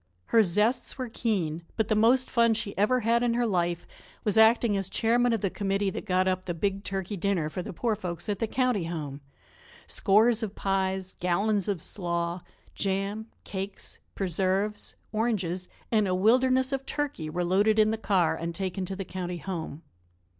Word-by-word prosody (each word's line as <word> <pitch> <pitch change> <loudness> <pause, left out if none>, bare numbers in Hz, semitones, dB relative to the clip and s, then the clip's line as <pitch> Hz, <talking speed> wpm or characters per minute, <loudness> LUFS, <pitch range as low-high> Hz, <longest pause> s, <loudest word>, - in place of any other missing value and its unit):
Her 230 - +7
zests 215 +9 +1
were 255 -2 -4
keen. 185 -9 -1 0.2
But 220 -2 +1
the 220 - +2
most 240 +5 +4
fun 235 -2 +3
she 215 -2 -3
ever 245 +6 +2
had 230 +2 +2
in 240 -1 +1
her 240 0 +2
life 175 -4 0 0.4
was 210 - +1
acting 220 0 +5
as 195 -2 -2
chairman 240 +2 +2
of 225 -3 0
the 195 - 0
committee 195 -1 0
that - - -6
got 185 0 +2
up 185 0 0
the 175 - -3
big 195 +3 -1
turkey 195 +1 -3
dinner 180 -5 0
for 180 - -3
the - - -6
poor 220 +5 -1
folks 175 -2 -5
at 205 -2 -2
the 225 - 0
county 250 -6 +1
home; 150 -4 -5 0.6
scores 220 +4 +3
of 215 -2 -4
pies, 190 -1 -1
gallons 200 +3 +1
of 195 -6 -2
slaw; 170 -2 -2 0.3
jam, 200 +2 -2 0.2
cakes, 195 0 -6 0.2
preserves, 195 +3 -1 0.2
oranges 195 -6 -1 0.2
and 215 -3 +3
a 185 - +1
wilderness 255 +6 +3
of 270 -1 -3
turkey 275 - -3
were 175 +3 -1
loaded 200 +5 +3
in 215 0 +5
the 220 - -1
car 185 -6 +2
and 170 0 -4
taken 190 0 -3
to 195 - -4
the 195 0 -5
county 180 -1 -4
home. 165 -3 -5
195 Hz, 180 wpm, -28 LUFS, 180-220 Hz, 0.6 s, Her